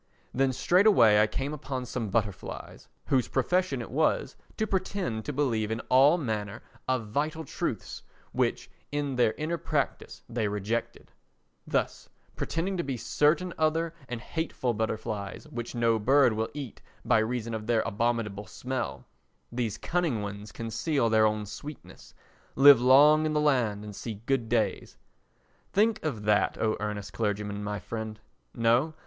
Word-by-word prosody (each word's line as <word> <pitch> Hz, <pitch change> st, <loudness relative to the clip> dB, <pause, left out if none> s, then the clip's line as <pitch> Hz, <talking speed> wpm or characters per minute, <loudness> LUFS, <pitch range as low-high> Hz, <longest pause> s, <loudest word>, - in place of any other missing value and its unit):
Then 135 Hz, +1 st, +2 dB
straightway 175 Hz, -, +5 dB
I 105 Hz, -, +5 dB
came 135 Hz, +6 st, -3 dB
upon 135 Hz, -4 st, -4 dB
some 115 Hz, -2 st, -3 dB
butterflies 100 Hz, -2 st, -3 dB, 0.2 s
whose 130 Hz, -3 st, +2 dB
profession 140 Hz, -1 st, 0 dB
it -, -, -10 dB
was 155 Hz, +4 st, +1 dB, 0.2 s
to 220 Hz, -, +1 dB
pretend 185 Hz, -, -2 dB
to 150 Hz, -, -2 dB
believe 120 Hz, -7 st, 0 dB
in 110 Hz, +1 st, -2 dB
all 135 Hz, +6 st, +6 dB
manner 110 Hz, -, -3 dB, 0.2 s
of 125 Hz, -5 st, -1 dB
vital 155 Hz, +6 st, -2 dB
truths -, -, -4 dB, 0.3 s
which -, -, 0 dB, 0.2 s
in 145 Hz, -2 st, -2 dB
their 120 Hz, -3 st, +3 dB
inner 165 Hz, +2 st, -3 dB
practice -, -, -2 dB
they 115 Hz, -3 st, -1 dB
rejected; 105 Hz, +3 st, -3 dB, 0.6 s
thus, -, -, -1 dB, 0.3 s
pretending 185 Hz, +4 st, -2 dB
to 170 Hz, -, -1 dB
be 135 Hz, -2 st, -3 dB
certain 160 Hz, +9 st, +1 dB
other 160 Hz, +1 st, +1 dB, 0.2 s
and 120 Hz, -2 st, -4 dB
hateful 130 Hz, -4 st, -2 dB
butterflies 110 Hz, +2 st, -3 dB
which 120 Hz, -4 st, -6 dB
no 115 Hz, -1 st, +2 dB
bird 130 Hz, +2 st, +4 dB
will 110 Hz, +1 st, -2 dB
eat 140 Hz, -6 st, -7 dB, 0.2 s
by -, -, +4 dB
reason 115 Hz, +1 st, -2 dB
of 110 Hz, -1 st, -5 dB
their 115 Hz, -2 st, +3 dB
abominable 110 Hz, -2 st, -1 dB
smell, 130 Hz, 0 st, -4 dB, 0.5 s
these 120 Hz, -3 st, -2 dB
cunning 165 Hz, -11 st, -1 dB
ones 100 Hz, +1 st, -7 dB
conceal 115 Hz, +2 st, -1 dB
their 110 Hz, -1 st, +5 dB
own 105 Hz, 0 st, -2 dB
sweetness, 145 Hz, +8 st, -10 dB, 0.4 s
live 140 Hz, -2 st, +8 dB
long 145 Hz, +5 st, +7 dB
in 155 Hz, -, -1 dB
the 150 Hz, -, +2 dB
land 125 Hz, -9 st, +1 dB
and 105 Hz, -1 st, -8 dB
see 115 Hz, +1 st, -5 dB
good 130 Hz, -4 st, 0 dB
days. 115 Hz, -2 st, -1 dB, 0.8 s
Think 220 Hz, +2 st, +2 dB
of 130 Hz, -10 st, -3 dB
that, 105 Hz, 0 st, +2 dB
O 110 Hz, -1 st, +1 dB
Earnest 105 Hz, -1 st, -4 dB
Clergyman, 105 Hz, -1 st, -2 dB
my 105 Hz, 0 st, -3 dB
friend! 110 Hz, 0 st, -6 dB, 0.4 s
No. 120 Hz, +7 st, +2 dB
120 Hz, 150 wpm, -28 LUFS, 110-150 Hz, 0.8 s, live